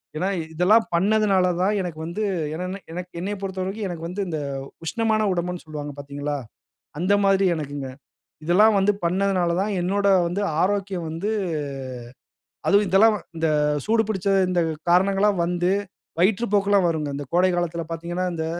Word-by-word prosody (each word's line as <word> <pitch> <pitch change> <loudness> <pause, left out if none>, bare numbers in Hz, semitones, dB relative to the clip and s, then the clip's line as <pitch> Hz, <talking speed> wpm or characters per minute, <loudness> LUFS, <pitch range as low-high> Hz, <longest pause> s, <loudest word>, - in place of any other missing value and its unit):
ஏனா, 180 +5 -1 0.3
இதெல்லாம் 205 +7 +4
பண்ணதுனால 195 0 +3
தான், 200 +3 +2
எனக்கு 175 -4 -5
வந்து 170 +6 -4 0.3
என்னனா, 180 +4 -4
எனக்கு 180 +1 -6
என்னயப் 200 +2 -4
பொறுத்தவரைக்கும் 190 +2 -3
எனக்கு 165 -2 -6
வந்து, 185 +4 -4
இந்த 160 -3 -3 0.5
உஷ்ணமான 220 +2 +1
உடம்புனு 180 0 -3
சொல்வாங்க 150 -1 -6
பாத்தீங்களா? 145 +1 -4 0.6
அந்த 185 +4 +2
மாரி 195 0 +4
எனக்குங்க. 145 -2 -5 0.6
இதெல்லாம் 210 +5 +5
வந்து, 205 +2 +3
பண்ணதுனாலதான் 185 +1 +1
என்னோட 200 +3 +1 0.2
வந்து, 180 +4 -2 0.2
ஆரோக்கியம் 195 -2 -1
வந்து, 180 +7 -3 1.4
அதுவும் 205 +1 +4
இதெல்லாம் 210 +4 +5
வ 200 - -7 0.2
இந்த 160 0 +1 0.4
சூடு 225 0 +3
பிடுச்ச, 200 -2 -2 0.2
இந்த 175 -2 +2 0.3
காரணங்கள்லாம் 195 +1 +3
வந்து, 175 +1 0 0.5
வயிற்று 205 +5 +3
போக்கெல்லாம் 200 -2 +3
வருங்க. 155 -3 -1
இந்த 145 -1 -6
கோடை 185 +1 +4
காலத்தில 170 -1 -2
பாத்தீங்கன்னா, 175 +2 -3
இந்த 160 -1 -3
185 Hz, 140 wpm, -23 LUFS, 170-200 Hz, 1.4 s, இதெல்லாம்